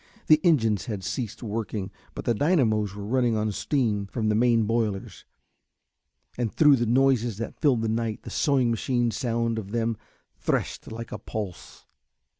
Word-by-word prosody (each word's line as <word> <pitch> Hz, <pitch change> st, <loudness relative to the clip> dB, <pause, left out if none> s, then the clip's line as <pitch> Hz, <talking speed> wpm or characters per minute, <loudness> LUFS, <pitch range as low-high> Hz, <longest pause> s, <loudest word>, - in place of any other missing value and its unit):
The 155 Hz, 0 st, +5 dB
engines 115 Hz, -, +3 dB
had 105 Hz, -5 st, -4 dB
ceased 115 Hz, +4 st, -4 dB
working 105 Hz, -3 st, -3 dB, 0.2 s
but -, -, -6 dB
the 120 Hz, -, +2 dB
dynamos 110 Hz, -, +2 dB
were 100 Hz, -1 st, -6 dB
running 120 Hz, 0 st, +1 dB
on 105 Hz, 0 st, 0 dB
steam 105 Hz, -4 st, 0 dB
from 110 Hz, +1 st, -1 dB
the -, -, +2 dB
main 115 Hz, +1 st, +3 dB
boilers, 110 Hz, -3 st, -2 dB, 1.1 s
and 115 Hz, -3 st, 0 dB
through 150 Hz, -3 st, +5 dB
the 120 Hz, -1 st, 0 dB
noises 120 Hz, -3 st, +2 dB
that 115 Hz, -, -6 dB
filled 130 Hz, -7 st, +3 dB
the -, -, 0 dB
night 110 Hz, -1 st, -2 dB
the -, -, -8 dB
sewing 130 Hz, -5 st, +2 dB
machine 120 Hz, +1 st, 0 dB
sound 115 Hz, -2 st, -1 dB
of 100 Hz, -3 st, -8 dB
them 115 Hz, +1 st, 0 dB, 0.4 s
threshed -, -, -2 dB
like 115 Hz, +1 st, -7 dB
a 105 Hz, -, -5 dB
pulse. 105 Hz, -4 st, -7 dB
115 Hz, 165 wpm, -26 LUFS, 105-125 Hz, 1.1 s, The